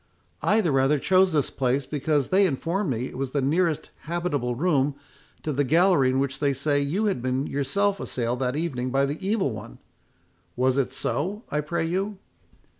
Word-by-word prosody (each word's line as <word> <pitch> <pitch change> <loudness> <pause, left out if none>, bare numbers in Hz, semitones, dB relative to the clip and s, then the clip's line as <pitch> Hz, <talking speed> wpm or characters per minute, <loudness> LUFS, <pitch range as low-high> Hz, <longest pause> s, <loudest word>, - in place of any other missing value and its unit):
I 220 +1 +3
the 170 -7 +1
rather 135 +2 +3
chose 185 +5 +3
this 150 -4 +1
place, 130 +1 0
because 145 -1 0
they 195 +1 +4
informed 170 +5 -1
me 120 -1 -1
it 130 - -7
was 135 -1 -3
the - - +4
nearest 155 +1 0
habitable 155 -7 -1
room 145 -2 +1 0.5
to 155 - -2
the 145 +2 +1
gallery 165 -1 +4
in 130 - +1
which 140 0 -1
they 140 -2 +2
say 145 +2 +1
you 160 +10 0
had 195 - 0
been 130 +2 -1
yourself 195 +10 0
assailed 120 0 -2
that 125 0 -1
evening 135 -6 -2
by 135 +2 +2
the 145 +6 -4
Evil 195 - +1
One.—Was 125 +3 -5
it 135 - 0
so, 195 +9 -3
I 150 - +1
pray 160 +2 -2
you?" 190 +4 -2
145 Hz, 185 wpm, -25 LUFS, 130-175 Hz, 0.5 s, they